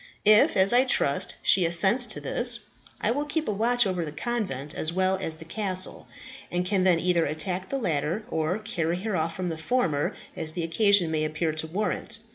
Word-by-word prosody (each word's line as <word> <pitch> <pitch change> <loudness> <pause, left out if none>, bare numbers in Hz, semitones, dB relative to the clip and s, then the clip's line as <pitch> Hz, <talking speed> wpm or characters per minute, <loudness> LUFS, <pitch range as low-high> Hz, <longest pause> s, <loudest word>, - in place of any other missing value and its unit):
If, 210 -1 +5
as 190 +3 +4
I 250 +1 +5
trust, 140 - +1
she 185 - +5
assents 190 +9 +3
to - - -5
this, - - +3 0.4
I - - +1
will 285 +5 -1
keep 310 +2 -2
a - - 0
watch 240 +3 +2
over 185 -3 -2
the 150 - -6
convent 155 - -4
as 160 - -1
well 185 +2 +1
as 160 -4 -1
the 160 - -9
castle, 185 0 0 0.4
and 180 0 -2
can 190 -1 0
then 175 -3 +4
either 175 -1 +1
attack 180 +5 -2
the 275 - -2
latter, 170 - -2
or 160 +4 -1
carry 180 -6 -3
her 215 -3 -2
off 165 0 -2
from 180 0 -3
the 160 -1 -5
former, 160 - -1 0.2
as 155 0 -3
the 170 - -3
occasion 180 0 +3
may 155 -1 -1
appear 155 +1 -2
to 155 +1 -3
warrant. 210 +5 -3
180 Hz, 205 wpm, -26 LUFS, 160-215 Hz, 0.4 s, If